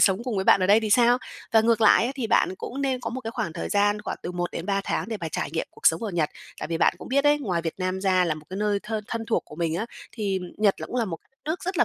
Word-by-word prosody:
sống 195 Hz, +3 st, +3 dB
cùng 240 Hz, -5 st, -2 dB
với 190 Hz, -, 0 dB
bạn -, -, +6 dB
ở 185 Hz, -, +2 dB
đây 210 Hz, +3 st, +6 dB
thì 215 Hz, -1 st, -2 dB
sao? 240 Hz, +2 st, +5 dB, 0.3 s
Và 225 Hz, -, +7 dB
ngược 230 Hz, 0 st, +2 dB
lại 220 Hz, +1 st, +6 dB
ấy 255 Hz, -, -1 dB
thì 260 Hz, -4 st, -2 dB
bạn 190 Hz, -, +2 dB
cũng 275 Hz, +7 st, -5 dB
nên 260 Hz, -2 st, 0 dB
có 230 Hz, -1 st, -4 dB
một 260 Hz, +2 st, -4 dB
cái 225 Hz, -2 st, -5 dB
khoảng 170 Hz, -, -3 dB
thời 170 Hz, -, -4 dB
gian 205 Hz, 0 st, +2 dB
khoảng -, -, -4 dB
từ 180 Hz, -, -4 dB
1-3 175 Hz, +2 st, -2 dB
tháng -, -, -2 dB
để 220 Hz, -, -2 dB
mà 165 Hz, -, -3 dB
trải -, -, -3 dB
nghiệm 165 Hz, -, -1 dB
cuộc -, -, -3 dB
sống 160 Hz, +5 st, +4 dB
ở 220 Hz, -, -2 dB
Nhật. 165 Hz, -4 st, 0 dB, 0.3 s
Tại -, -, -4 dB
vì 165 Hz, -1 st, -1 dB
bạn -, -, +4 dB
cũng -, -, -9 dB
biết 280 Hz, +2 st, +2 dB
đấy, 295 Hz, 0 st, +4 dB
ngoài 180 Hz, -, -1 dB
Việt 165 Hz, -, -3 dB
Nam 185 Hz, +1 st, -2 dB
ra 185 Hz, -2 st, +3 dB
là 160 Hz, -2 st, 0 dB
một 155 Hz, 0 st, -11 dB
cái 190 Hz, -, -5 dB
nơi 205 Hz, -1 st, +1 dB
thơ 220 Hz, 0 st, -3 dB
thân 230 Hz, -1 st, -3 dB
thuộc 230 Hz, -, +1 dB
của 150 Hz, -, -13 dB
mình 165 Hz, -2 st, -1 dB
á, 220 Hz, +7 st, -2 dB, 0.3 s
thì 200 Hz, -4 st, -1 dB, 0.2 s
Nhật 205 Hz, -2 st, +2 dB
là -, -, -4 dB
cũng 250 Hz, -, -5 dB
là 235 Hz, -, +2 dB
một 170 Hz, -5 st, -4 dB
cái -, -, -35 dB
đất 265 Hz, -, -43 dB
nước 320 Hz, +5 st, -3 dB
rất 370 Hz, 0 st, -2 dB
là -, -, +6 dB
210 Hz, 330 wpm, -25 LUFS, 180-235 Hz, 0.3 s, Và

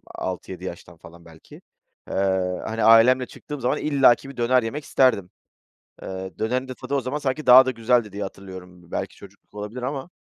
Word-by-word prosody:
6-7 95 Hz, 0 st, -6 dB
yaştan 85 Hz, -1 st, -9 dB
falan, 85 Hz, +1 st, -16 dB
belki, 80 Hz, -1 st, -16 dB, 0.5 s
eee, -, -, -6 dB, 0.5 s
hani, 110 Hz, 0 st, -3 dB
ailemle 115 Hz, +3 st, +6 dB
çıktığım 145 Hz, +3 st, -9 dB
zaman 125 Hz, -, 0 dB
illaki 135 Hz, -3 st, +3 dB
bir 140 Hz, -, -12 dB
döner 125 Hz, +1 st, +2 dB
yemek 140 Hz, +7 st, -5 dB
isterdim. 115 Hz, -12 st, +2 dB, 0.7 s
Eee, 95 Hz, 0 st, -6 dB
dönerin 125 Hz, +4 st, -1 dB
de 130 Hz, -, -6 dB
tadı 130 Hz, +3 st, -5 dB
o 140 Hz, -, +1 dB
zaman 130 Hz, +4 st, -3 dB
sanki 145 Hz, +1 st, -3 dB
daha 130 Hz, +1 st, +9 dB
da 130 Hz, -, 0 dB
güzeldi 115 Hz, -2 st, +1 dB
diye 100 Hz, 0 st, -5 dB
hatırlıyorum. 95 Hz, -2 st, -10 dB
B 85 Hz, -, -21 dB
belki -, -, -4 dB
çocukluk -, -, -17 dB
olabilir 105 Hz, +4 st, -7 dB
ama. 135 Hz, +4 st, -4 dB
115 Hz, 180 wpm, -23 LUFS, 95-130 Hz, 0.7 s, daha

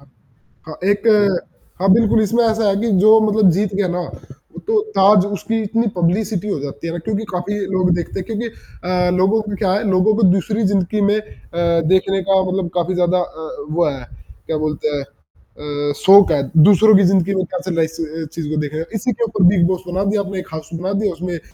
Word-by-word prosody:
अ -, -, -21 dB, 0.6 s
हाँ 155 Hz, -, -8 dB
एक 205 Hz, +3 st, -1 dB, 0.7 s
हाँ 195 Hz, 0 st, +4 dB
बिल्कुल 220 Hz, 0 st, +3 dB
इसमें 230 Hz, +3 st, +1 dB
ऐसा 220 Hz, -1 st, +1 dB
है 195 Hz, -, +1 dB
कि 230 Hz, -, -1 dB
जो 220 Hz, +1 st, +7 dB
मतलब 215 Hz, -2 st, +3 dB
जीत 200 Hz, 0 st, -1 dB
गया 195 Hz, -1 st, 0 dB
ना 175 Hz, +1 st, -2 dB, 0.7 s
तो 440 Hz, -1 st, +3 dB, 0.2 s
ताज़ 200 Hz, 0 st, +5 dB
उसकी 215 Hz, +2 st, -3 dB
इतनी 230 Hz, +3 st, -1 dB
पब्लिसिटी 190 Hz, +3 st, -1 dB
हो 195 Hz, -, -2 dB
जाती 145 Hz, +3 st, -7 dB
है 165 Hz, -, -3 dB
ना 175 Hz, -, -5 dB
क्योंकि 220 Hz, 0 st, -2 dB
काफ़ी 180 Hz, +3 st, -3 dB, 0.2 s
लोग 185 Hz, -1 st, +1 dB
देखते 175 Hz, +2 st, -4 dB
हैं -, -, -6 dB
क्योंकि 225 Hz, +1 st, -4 dB, 0.4 s
अ, 180 Hz, 0 st, 0 dB
लोगों 195 Hz, +4 st, +2 dB
को 205 Hz, -2 st, -6 dB
क्या 190 Hz, -2 st, 0 dB
है 205 Hz, +2 st, -1 dB
लोगों 190 Hz, +3 st, +3 dB
को 225 Hz, -, -1 dB
दूसरी 210 Hz, +4 st, -1 dB
ज़िंदगी 200 Hz, +2 st, 0 dB
में 205 Hz, +1 st, +2 dB
अ, 170 Hz, -5 st, -2 dB
देखने 190 Hz, +1 st, +2 dB
का 190 Hz, 0 st, +2 dB
मतलब 185 Hz, -1 st, -2 dB
काफ़ी 180 Hz, +1 st, -1 dB
ज़्यादा 180 Hz, 0 st, +1 dB
अ, 160 Hz, -3 st, -6 dB, 0.2 s
वो 170 Hz, +2 st, +1 dB
है 135 Hz, -3 st, -6 dB, 0.4 s
क्या 160 Hz, -, -2 dB
बोलते 150 Hz, 0 st, -2 dB
हैं 140 Hz, -, -3 dB, 0.9 s
अ, -, -, -2 dB
शोक 195 Hz, -2 st, +7 dB
है 145 Hz, -, +2 dB, 0.3 s
दूसरों 215 Hz, +1 st, +6 dB
की 200 Hz, -, +4 dB
ज़िंदगी 195 Hz, 0 st, +1 dB
में 190 Hz, -, 0 dB
कैसे 185 Hz, +1 st, -3 dB
लाइस 160 Hz, 0 st, -2 dB
अ, -, -, -1 dB, 0.2 s
एस 160 Hz, -, -5 dB
चीज़ 160 Hz, -3 st, -5 dB
को 155 Hz, -, -3 dB
देखा 150 Hz, +1 st, -5 dB
जाए 160 Hz, -, -3 dB
इसी 230 Hz, +4 st, -1 dB
के 235 Hz, -, -3 dB
ऊपर 210 Hz, -3 st, -1 dB
बिग 175 Hz, -4 st, +3 dB
बॉस 185 Hz, 0 st, -2 dB
बना 185 Hz, +2 st, -2 dB
दिया 210 Hz, -1 st, 0 dB
अपने 195 Hz, -1 st, -5 dB
कहा 160 Hz, -3 st, -7 dB
सुना 175 Hz, +4 st, -4 dB
दिया 205 Hz, -4 st, -1 dB
उसमें 180 Hz, +2 st, -6 dB
अ, -, -, -10 dB
190 Hz, 220 wpm, -18 LUFS, 175-210 Hz, 0.9 s, जो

